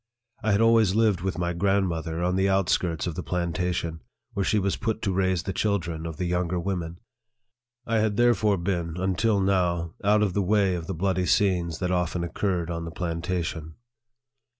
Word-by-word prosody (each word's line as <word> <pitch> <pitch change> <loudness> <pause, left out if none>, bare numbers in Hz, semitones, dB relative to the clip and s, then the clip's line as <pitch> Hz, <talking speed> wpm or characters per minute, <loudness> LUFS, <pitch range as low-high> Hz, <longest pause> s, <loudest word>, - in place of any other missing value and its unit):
I 110 - +1
had 100 - +3
always 115 -4 +4
lived 110 -6 +3
with 95 +1 -2
my 85 0 -1
grandmother 85 -3 0
on 90 +1 +1
the 95 +1 +2
outskirts 90 -3 +1
of 85 - -2
the 90 - -4
plantation, 85 -2 -2 0.3
where 100 - -1
she 110 - +1
was 100 -1 +1
put 110 -2 -2
to 95 - 0
raise 95 -2 +1
the 95 - -3
children 85 -6 -1
of 80 -2 -7
the 90 - -2
younger 90 0 0
women. 85 -2 -3 0.9
I 115 -1 +1
had 105 -1 0
there 120 0 +5
fore 105 -1 +1
been, 85 -2 -2
until 95 +3 +1
now, 90 -3 +1
out 105 +1 +4
of 100 -4 0
the 100 - +1
way 100 0 +2
of 85 -2 -4
the 95 - -3
bloody 95 +1 0
scenes 85 -4 +2
that 90 -1 -2
often 90 -1 0
occurred 85 -1 -2
on 85 0 -3
the - - -5
plantation. 85 -1 -3
90 Hz, 190 wpm, -26 LUFS, 85-100 Hz, 0.9 s, there